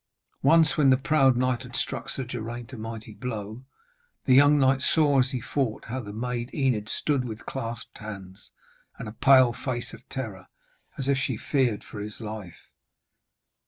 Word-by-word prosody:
Once, 160 +3 +5
when 145 -3 +5
the 130 - +6
proud 135 -2 +3
knight 125 -1 +1
had - - -9
struck - - -2
Sir 135 - -3
Geraint 120 0 -6
a - - -5
mighty 110 0 -7
blow, 110 0 -6 0.6
the 130 - +4
young 145 +3 +7
knight 135 -1 +3
saw, 145 -2 +3
as 130 0 +3
he 130 -2 -2
fought, 125 -2 -2
how 130 +3 -2
the 105 -5 -7
maid 120 +2 -3
Enid 125 -7 0
stood 140 -4 0
with 115 -2 -7
clasped 115 -3 -5
hands 95 -3 -9 0.5
and 115 - -6
a - - -5
pale 130 +1 +5
face 120 0 -4
of - - -10
terror, 105 -8 -6 0.5
as 135 - -3
if 140 -1 +2
she 130 -4 -1
feared 125 -6 0
for 105 - -9
his 105 0 -6
life. 105 -6 -8
125 Hz, 175 wpm, -26 LUFS, 110-135 Hz, 0.6 s, young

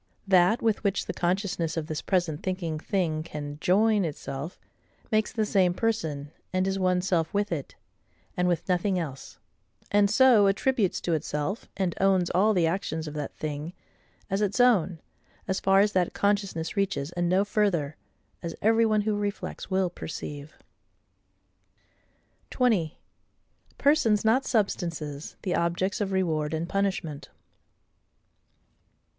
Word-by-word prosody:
That 185 +3 +4
with 220 -2 +1
which 200 -1 0
the - - -4
consciousness 180 -2 -1
of 160 - -1
this 155 -1 -4
present 175 -6 0
thinking 175 -4 -3
thing 160 -3 -1
CAN 150 -2 -7
join 210 +2 +3
itself, 150 0 -5 0.5
makes 215 -1 +2
the 220 -3 0
same 185 -4 +2
person, 160 -11 -2 0.2
and 185 0 +1
is 195 0 -1
one 180 -1 +2
self 175 -4 0
with 205 -1 0
it, 150 -5 -4 0.6
and 180 0 +1
with 175 -2 0
nothing 185 +1 +1
else; 140 -6 -6 0.5
and 205 0 +4
so 225 -2 +6
attributes 200 0 +1
to 170 - -1
itself, 155 +5 -3
and 185 -3 0
owns 190 -3 +3
all 205 +4 +3
the 175 -2 +3
actions 160 -2 -2
of 150 - -6
that 150 -2 -5
thing, 150 +2 -5 0.5
as 195 +1 -1
its 205 +3 0
own, 195 -9 +4 0.5
as 190 - 0
far 195 0 +4
as 205 0 +3
that 185 -3 +1
consciousness 200 -5 -1
reaches, 185 -7 -1
and 175 -1 -1
no 190 +3 +3
further; 190 -8 0 0.5
as 170 -1 -5
every 225 +1 +3
one 215 -1 +2
who 210 0 0
reflects 205 -1 -4
will 190 -2 +1
perceive. 150 -3 -7 1.9
20. 210 -11 +1 0.8
Persons, 235 -8 +3
not 255 +5 +3
Substances, 165 - -2
the 185 - -1
Objects 180 +4 0
of 195 -1 -1
Reward 160 -5 0
and 165 +2 -3
Punishment. 190 -7 -2
185 Hz, 140 wpm, -27 LUFS, 160-205 Hz, 1.9 s, so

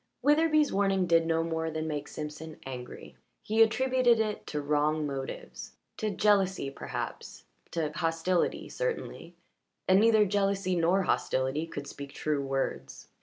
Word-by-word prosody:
Witherbee's 305 0 +4
warning 195 -1 +2
did 165 -1 +3
no 165 0 +1
more 160 0 -2
than 160 0 -3
make 150 -2 -3
Simpson 155 +1 -7
angry; 125 -2 -8 0.3
he 220 +1 +2
attributed 245 +1 +4
it 215 -1 -2
to 150 - -3
wrong 150 +1 +1
motives 135 -2 -6 0.2
to 215 - -1
jealousy 195 -6 +2
perhaps - - -6 0.3
to 160 -3 -2
hostility 165 +3 0
certainly, - - -4 0.5
and 185 +1 +6
neither 220 -1 +5
jealousy 195 -1 0
nor 175 +3 +2
hostility 135 0 0
could 145 -3 -6
speak 140 0 -9
true 150 -2 -1
words. 135 0 -3
165 Hz, 135 wpm, -29 LUFS, 150-210 Hz, 0.5 s, and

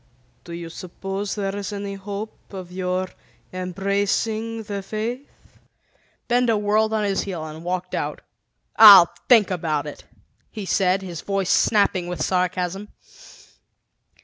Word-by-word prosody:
"Do 170 - -8
you 170 -1 -6
suppose 195 +3 -5
there 195 -1 -3
is 200 -1 -4
any 200 -1 -5
hope 200 +2 -8
of 185 -2 -8
your 185 0 -2 0.4
embracing 200 +5 -1
the 205 -2 -5
Faith?" 225 +7 -5 1.0
Benda 240 -2 +2
whirled 210 +1 +1
on 220 -1 0
his 200 -1 0
heel 175 -5 -5
and 155 +1 -9
walked 180 +1 -3
out. - - -3 0.6
"I'll 200 -6 +10 0.2
think 220 -6 +6
about 160 -5 -1
it!" 150 - -9 0.4
he 210 -3 -7
said, 190 +1 +1
his 175 -4 -6
voice 195 -1 -1
snapping 200 -5 +2
with 180 0 -5
sarcasm. 185 +2 -1
195 Hz, 130 wpm, -23 LUFS, 180-210 Hz, 1.0 s, I'll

